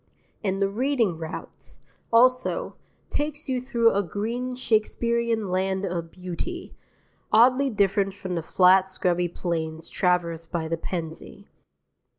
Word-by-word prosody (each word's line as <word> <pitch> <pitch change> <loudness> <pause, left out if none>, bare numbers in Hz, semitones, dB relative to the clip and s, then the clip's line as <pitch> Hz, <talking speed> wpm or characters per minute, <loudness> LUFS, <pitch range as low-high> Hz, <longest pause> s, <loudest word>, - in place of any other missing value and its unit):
And 195 -1 0
the 195 - +3
Reading 230 -2 +1
route, 160 -1 -8 0.4
also, 255 - +3 0.4
takes 295 0 -2
you 255 -2 -1
through 235 -3 +3
a 200 - +2
green 230 +7 -3
Shakespearean 235 -2 0
land 190 +1 0
of 170 -3 -3
beauty, 185 - -6 0.6
oddly 255 +5 +5
different 200 -3 +1
from 190 -2 -5
the 170 - -1
flat 185 +3 +4
scrubby 180 -1 0
plains 165 -2 -3
traversed 170 -2 0
by 165 -2 -2
the 165 - -1
Pennsy. 165 +3 -6
195 Hz, 125 wpm, -25 LUFS, 175-235 Hz, 0.6 s, oddly